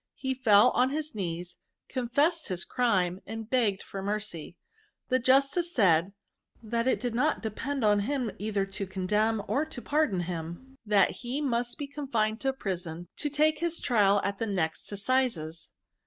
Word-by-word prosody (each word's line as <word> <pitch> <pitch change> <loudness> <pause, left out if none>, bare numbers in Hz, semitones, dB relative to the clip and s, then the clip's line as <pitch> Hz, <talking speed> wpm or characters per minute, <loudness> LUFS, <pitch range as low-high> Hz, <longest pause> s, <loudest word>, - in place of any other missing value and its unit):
He 265 -1 -2
fell 240 -2 +5
on 250 +1 +3
his 305 +2 -3
knees, 175 -2 -4 0.3
confessed 285 +7 +1
his 185 -2 -3
crime, 190 -7 +1
and 225 -1 -6
begged 225 -6 +1
for 195 - -7
mercy. 200 -5 -4 0.5
The 255 - +3
jus 270 +2 +4
tice 350 -1 -1
said, 185 -3 +4 0.5
that 230 +2 -1
it - - +2
did 245 -2 -2
not 285 +5 +1
depend 255 +4 -2
on 205 -1 +4
him 250 +1 -1
either 205 -1 -1
to 195 0 -5
condemn 210 +3 0
or 285 - +1
to 315 -5 -7
pardon 285 - +1
him; 175 +10 -6
that 205 -2 +3
he 250 +3 -3
must 240 -4 -1
be 290 - -4
confined 260 -6 -2
in 270 0 +1
prison 175 -6 -5
to 295 - 0
take 305 +2 +2
his 340 0 0
trial 205 -4 +3
at 200 0 -2
the 225 - -1
next 175 -5 -2
assizes. 200 -7 -1
220 Hz, 170 wpm, -29 LUFS, 195-265 Hz, 0.5 s, fell